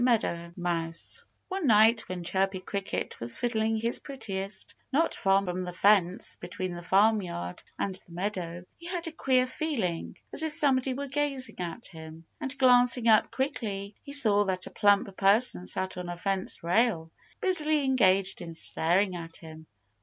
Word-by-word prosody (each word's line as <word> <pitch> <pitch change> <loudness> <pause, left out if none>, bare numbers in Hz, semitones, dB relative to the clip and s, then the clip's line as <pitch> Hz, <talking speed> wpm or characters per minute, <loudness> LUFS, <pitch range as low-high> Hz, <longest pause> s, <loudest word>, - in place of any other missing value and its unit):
MEADOW 170 -8 0
MOUSE 170 - -4 0.2
One 375 -5 -2
night 225 0 +5
when 180 -1 -4
Chirpy 190 +2 0
Cricket 195 +1 -4
was 115 0 -1
fiddling 225 -2 0
his 230 +2 +1
prettiest, 195 -8 -5 0.2
not 320 +5 +2
far 195 0 +2
from 180 0 -3
the 180 0 -6
fence 185 -1 +3
between 185 -1 -5
the 175 - -7
farmyard 185 - +1 0.2
and 195 - -2
the 185 -2 -8
meadow, 175 -1 -4
he 340 - -10
had 350 -1 -3
a 330 - -4
queer 260 -5 +2
feeling, 255 - -3 0.2
as - - 0
if 315 -1 -1
somebody 270 -4 +2
were 280 +2 -4
gazing 280 -3 -1
at 180 +6 -5
him. 160 -1 -9
And 275 0 -4
glancing 245 -2 +4
up 220 -1 +5
quickly, 215 -7 -3
he 280 - -10
saw 215 -8 +5
that 185 -1 -2
a - - -9
plump 200 -1 +2
person 200 -1 +3
sat 190 0 -2
on 180 -1 -5
a 175 - -5
fence 190 0 -2
rail, 175 -3 +1 0.3
busily 310 -5 +2
engaged 195 -8 +3
in 165 -1 -8
staring 180 +4 +1
at 165 -1 -7
him. 160 -1 -12
200 Hz, 165 wpm, -28 LUFS, 180-255 Hz, 0.3 s, night